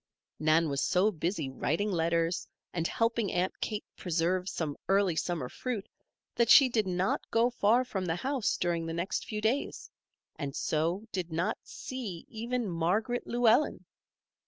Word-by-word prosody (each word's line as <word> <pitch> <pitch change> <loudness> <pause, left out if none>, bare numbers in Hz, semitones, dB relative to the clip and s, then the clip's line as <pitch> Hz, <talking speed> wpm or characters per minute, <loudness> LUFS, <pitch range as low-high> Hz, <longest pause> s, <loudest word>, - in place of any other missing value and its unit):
Nan 155 +1 +3
was 140 -1 -1
so 190 +4 +3
busy 165 -3 -2
writing 160 +9 -1
letters, 170 0 0 0.3
and 170 -1 0
helping 230 -2 0
Aunt 180 +1 0
Kate 210 -2 -3
preserve 180 +2 0
some 155 -5 -3
early 195 -3 +3
summer 160 -4 -1
fruit, 225 - -4 0.5
that 235 -1 +2
she 270 -2 +9
did 220 -4 +1
not 185 +1 0
go 235 +2 +3
far 240 +2 +3
from 195 -7 -3
the 165 - 0
house 260 +4 0
during 170 -2 -1
the 165 - -3
next 180 +4 -2
few 215 -1 -3
days, 235 +6 -1 0.5
and 140 -1 -4
so 170 +7 0
did 180 -3 -3
not 165 +2 -1
see 225 -10 -6
even 235 +1 -2
Margaret 190 +8 0
Llewellen. 240 +4 +3
185 Hz, 155 wpm, -30 LUFS, 165-225 Hz, 0.5 s, she